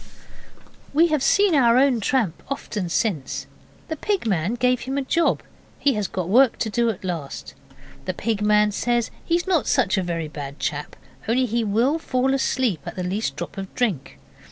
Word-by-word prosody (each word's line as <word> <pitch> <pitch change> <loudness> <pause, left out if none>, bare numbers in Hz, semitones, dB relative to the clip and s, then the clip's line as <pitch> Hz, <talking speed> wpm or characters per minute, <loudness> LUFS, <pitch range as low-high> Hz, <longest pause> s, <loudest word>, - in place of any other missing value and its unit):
We 335 +3 +5
have 305 -3 +1
seen 400 +5 +4
our 245 -5 +5
own 260 -2 +4
tramp 220 -6 0
often 210 -9 -3
since. 170 - -1 0.4
The 320 - -3
Pig 395 - -1
man 195 +1 0
gave 250 0 +2
him 265 +3 -4
a 280 - 0
job. 330 +5 +1 0.3
He 280 - +2
has 210 -3 -1
got 185 -2 -3
work 245 +5 +5
to 220 - -2
do 235 +1 +2
at 205 -4 -4
last. 165 -7 -5 0.5
The 185 - -1
Pig 220 +1 -1
man 210 0 +4
says 240 +2 0
he 335 - +1
is 345 - 0
not 365 -6 +1
such 215 -8 +2
a - - +1
very 170 -3 -3
bad 145 -2 -7
chap, 150 0 -3 0.3
only 250 +3 +2
he 235 0 0
will 235 +9 +1
fall 265 -3 0
asleep 255 - 0
after 185 - -5
the - - -2
least 205 +4 -2
drop - - -6
of 195 -1 -6
drink. 170 - -1
230 Hz, 190 wpm, -23 LUFS, 185-265 Hz, 0.5 s, We